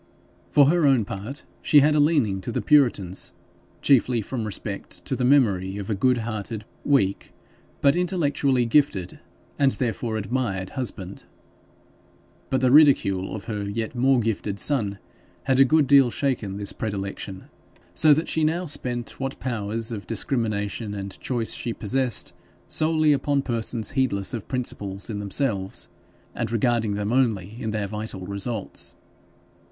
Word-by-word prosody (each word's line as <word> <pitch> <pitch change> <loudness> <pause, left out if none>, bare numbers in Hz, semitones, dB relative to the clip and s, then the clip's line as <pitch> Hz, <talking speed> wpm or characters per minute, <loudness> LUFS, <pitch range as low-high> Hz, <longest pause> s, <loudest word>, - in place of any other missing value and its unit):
For 145 - +6
her 160 +1 +3
own 130 -6 +3
part 110 +8 -6 0.2
she 145 - +6
had 150 +2 +4
a 150 - +3
leaning 140 - +2
to 120 - -4
the - - -1
puritans, 120 - +2 0.5
chiefly 125 -4 +3
from 115 0 -4
respect 105 - -5
to - - -1
the - - -2
memory 100 -8 +3
of 100 +1 -4
a - - +2
good 125 +5 +2
hearted, 110 -1 -4 0.2
weak, 130 -10 +1 0.5
but 140 0 +4
intellectually 145 -8 +1
gifted, 115 -8 +1 0.4
and, 140 -2 +4
therefore, 115 -2 -2
admired 100 -4 -2
husband; 100 -7 -4 1.2
but 130 -1 +1
the 130 -1 +3
ridicule 130 -11 +4
of 105 - -7
her 105 -3 -4
yet 110 +2 -3
more 130 +1 +3
gifted 105 -3 -2
son 105 -7 +1 0.5
had 130 0 +2
a - - +9
good 155 +2 +4
deal 135 -2 +6
shaken 115 -7 -2
this 100 -1 -4
predilection, 100 -2 -5 0.5
so 155 - +5
that 155 +3 +3
she 160 - 0
now 165 +4 +1
spent 120 -6 -3
what 135 0 -4
powers 115 -1 -2
of 100 -5 -6
discrimination 110 -2 -2
and 100 -1 -6
choice 120 -3 -1
she 115 - -3
possessed 125 +2 -1 0.3
solely 155 -1 +2
upon 140 0 0
persons, 115 -2 -2
heedless 125 -9 0
of 115 -4 -5
principles 105 -6 -3
in 105 - -4
themselves, 100 0 -2 0.4
and 115 -1 -3
regarding 115 -2 +1
them 105 +2 -2
only 110 -6 +1
in 110 - -2
their 105 -1 -1
vital 105 -2 -5
results. 100 +2 -3
115 Hz, 150 wpm, -24 LUFS, 100-135 Hz, 1.2 s, a